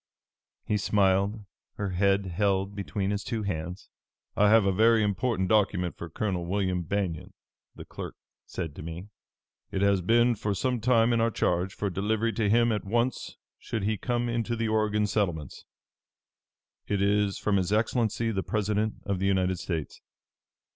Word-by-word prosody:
He 105 - 0
smiled, 100 +1 +1 0.3
her 100 -2 -3
head 100 +2 +2
held 95 +1 0
between 100 0 -2
his 100 0 -2
two 115 -3 -3
hands. 90 -1 -4 0.5
"'I 105 0 +4
have 110 -1 +5
a 95 - +3
very 110 +3 +4
important 105 -1 0
document 95 -4 +1
for 85 - -8
Colonel 90 -1 -2
William 95 -1 0
Banion,' 90 -2 -3 0.4
the - - -10
clerk - - -8 0.3
said 80 -5 -5
to - - -6
me. 85 +5 -7 0.6
'It 95 - -1
has 100 -2 +3
been 120 +6 +4
for 105 -2 -2
some 125 +5 0
time 115 0 +3
in 115 - +2
our 115 - +3
charge, 90 -3 0
for 100 -2 -2
delivery 110 +4 0
to 110 -3 0
him 115 +2 +4
at 105 -2 -1
once 120 +4 -1 0.2
should 110 -3 -4
he 110 +2 +1
come 120 +3 -1
into 120 0 -1
the 115 0 -1
Oregon 110 -1 +1
settlements. 90 - -2 1.2
It 100 - 0
is 100 0 +2
from 105 -2 +1
His 95 0 -1
Excellency, 115 +1 +1
the 95 -3 -1
President 105 +1 -1
of 100 -2 -1
the 95 - 0
United 95 -2 +1
States. 80 -5 -4
100 Hz, 165 wpm, -28 LUFS, 95-110 Hz, 1.2 s, have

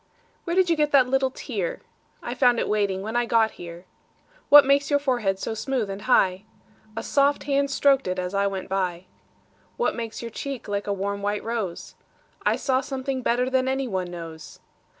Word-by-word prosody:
Where 340 -1 -1
did 375 -1 +4
you 335 - +3
get 300 -1 +1
that 265 -3 +6
little 265 +1 +1
tear?I - - -6
found 250 -2 +3
it - - -1
waiting 200 -2 0
when 220 +3 -5
I 240 0 +1
got 225 -1 +3
here. 170 +1 -10 0.6
What 290 -1 +10
makes 280 0 +3
your 285 - +4
forehead 240 -9 0
so 220 - -4
smooth 220 -2 -2
and 195 +1 -6
high?A 215 +1 -1
soft 280 +2 +2
hand 280 0 +1
strok'd 275 -3 +3
it 185 0 -2
as 180 +1 -3
I 200 0 +2
went 195 -1 -4
by. 185 -2 -2 0.7
What 480 - +1
makes 230 -1 -6
your 230 - -6
cheek 275 +1 -6
like 205 0 -3
a - - 0
warm 200 +1 -2
white 205 +1 -2
rose?I 220 -6 -4
saw 260 -1 0
something 265 -1 -4
better 245 +1 +1
than 260 0 +1
any 265 0 -1
one 185 -5 -3
knows. 165 -3 -9
230 Hz, 185 wpm, -24 LUFS, 195-270 Hz, 0.7 s, What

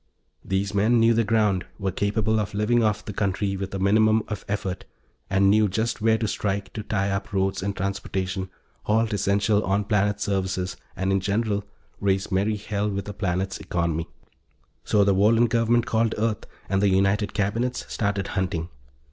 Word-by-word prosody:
Those 100 +1 -1
men 110 +4 +3
knew 115 +1 +5
the 115 +1 +2
ground, 105 -4 +2
were 100 -2 -2
capable 105 +3 0
of 105 -1 -3
living 115 +3 +2
off 105 -1 0
the 105 - -5
country 100 0 -1
with 95 0 -4
a - - -1
minimum 110 +3 +3
of 105 -3 -5
effort, 100 -2 -3 0.5
and 95 0 +3
knew 105 +2 +5
just 110 +4 -1
where 110 0 +3
to 110 0 -1
strike 100 -1 -2
to 110 - -4
tie 100 -2 -1
up 100 0 -3
roads 95 -1 0
and 100 +1 -3
transportation, 95 0 -3 0.4
halt 110 +1 +2
essential 100 +1 +2
on 100 +2 +1
planet 105 0 +1
services 95 -2 -1 0.2
and, 95 +1 -1
in 95 - +3
general, 100 +1 -1 0.3
raise 95 0 0
merry 100 +3 +1
hell 105 0 -2
with 100 -1 -4
a - - -5
planet's 95 -1 -2
economy. 85 -3 -2 0.8
So 105 -1 +3
the 100 0 +3
Wohlen 110 +5 +4
government 115 +1 +2
called 115 -2 +1
Earth 110 -1 -1 0.2
and 95 0 +1
the 100 - +4
United 100 +2 +1
Cabinets 115 +5 -1
started 100 -2 -2
hunting. 90 -3 -2
100 Hz, 175 wpm, -25 LUFS, 95-110 Hz, 0.8 s, knew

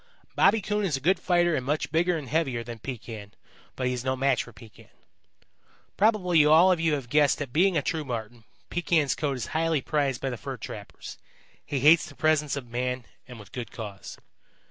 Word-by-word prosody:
Bobby 215 +2 +4
Coon 210 +2 -1
is 165 -8 0
a - - -7
good 175 +6 +2
fighter 175 -2 +2
and 130 - -2
much 145 +4 -2
bigger 170 +1 +2
and 145 -4 -7
heavier 135 -5 -1
than 115 0 -8
Pekan, 110 -4 -8 0.4
but 130 - -3
he 125 - +1
is 125 -1 -4
no 130 0 0
match 135 0 +1
for 120 - -13
Pekan. 110 0 -16 1.1
"Probably 185 -7 +3
all 160 +5 +6
of 180 - +1
you 165 -2 +2
have 135 -4 -6
guessed 145 +2 +3
that 135 -4 -6
being 180 +2 +3
a 145 - 0
true 160 +1 -2
Marten, 115 -3 -6 0.3
Pekan's 165 -5 +1
coat 140 -3 -2
is 120 - -4
highly 160 -1 +1
prized 140 -2 -1
by 135 - -2
the 125 - -5
fur - - -6
trappers. - - -9 0.4
He 140 -3 -3
hates 155 +4 +6
the 145 - -13
presence 150 -1 +1
of 140 -3 -5
man 125 +1 -3 0.2
and 125 -3 -10
with 100 -2 -14
good 120 -4 -6
cause. 105 -4 -8
140 Hz, 205 wpm, -27 LUFS, 125-165 Hz, 1.1 s, all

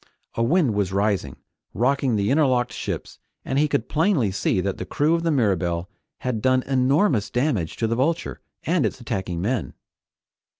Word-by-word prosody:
A - - -2
wind 135 - +3
was 100 -2 0
rising, 100 -8 0 0.4
rocking 130 0 +1
the 100 +2 +1
interlocked 130 -4 +2
ships, - - -5 0.3
and 135 - 0
he 150 - +3
could 120 -5 -1
plainly 155 - +2
see 95 0 0
that 95 +1 -2
the - - -2
crew 150 +3 +1
of 170 - +1
the 165 - 0
Mirabelle 95 - 0 0.3
had 125 -4 -2
done 130 +1 +3
enormous 135 - +2
damage 120 - 0
to 115 - -1
the 115 +1 0
Vulture 160 +7 -1 0.2
and 170 -2 +1
its - - -2
attacking 95 -7 -3
men. 120 -1 -2
125 Hz, 170 wpm, -23 LUFS, 100-140 Hz, 0.4 s, wind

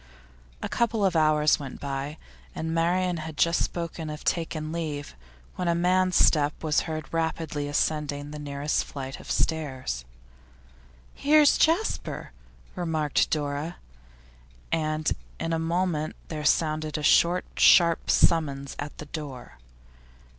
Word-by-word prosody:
A - - -1
couple 230 -3 +1
of 185 -3 +1
hours 155 -1 +4
went 135 -3 -7
by, 140 +2 -4 0.4
and 160 0 -3
Marian 175 +2 +1
had 160 -1 -7
just 170 0 +3
spoken 165 -2 -4
of 150 0 -7
taking 165 -2 -1
her 155 - -5
leave, 150 - -4 0.4
when 180 - -2
a 170 - +2
man's 185 +1 +2
step 150 -1 +3
was 155 -2 +2
heard 155 0 -5
rapidly 160 -3 -2
ascending 145 -1 -1
the 150 - -7
nearest 145 0 -1
flight 135 -1 -7
of - - -12
stairs. 130 - -1 1.1
'Here's 295 0 +5
Jasper,' 335 +8 0 0.4
remarked 160 -4 0
Dora, 150 +2 -2 1.0
and 155 -1 0 0.3
in 165 0 -2
a 165 - 0
moment 165 -2 -1
there 150 -2 -4
sounded 155 0 +1
a 150 - -5
short, 175 +4 +4
sharp 170 -2 +5
summons 140 -5 +2
at 145 0 -6
the 150 - -7
door. 140 - -8
155 Hz, 130 wpm, -26 LUFS, 145-170 Hz, 1.1 s, Here's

